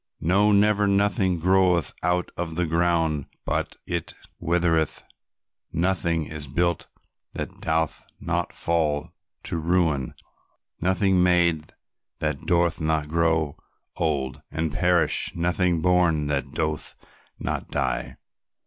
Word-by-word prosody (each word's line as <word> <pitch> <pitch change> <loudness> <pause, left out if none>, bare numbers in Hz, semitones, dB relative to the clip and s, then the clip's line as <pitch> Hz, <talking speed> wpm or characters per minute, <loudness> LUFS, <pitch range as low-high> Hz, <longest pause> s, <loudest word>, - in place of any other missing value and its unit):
"No, 100 +5 +3
never, 105 0 +4
nothing 100 -2 +2
groweth 90 -2 +3
out 90 +1 0
of 85 -2 -4
the 90 +1 +1
ground 80 -3 +1 0.2
but - - -2
it 85 -2 -3 0.2
withereth, 80 -2 +1 0.7
nothing 85 -2 0
is 75 -1 -6
built 85 +4 0 0.5
that - - -6
doth 80 0 -1
not 85 +1 -2
fall 75 -3 0 0.3
to - - -3
ruin, 80 -5 +1 0.7
nothing 95 +1 +2
made 85 -4 +2 0.4
that 75 -3 -3
doth 85 -1 +2
not 80 -1 0
grow 80 -2 +1 0.4
old 75 -6 -1
and 80 -1 -2
perish, 90 0 +2
nothing 85 0 +1
born 90 -3 +3
that 70 -2 -2
doth 75 -1 -2 0.4
not - - -3
die. - - -2
85 Hz, 110 wpm, -25 LUFS, 80-90 Hz, 0.7 s, never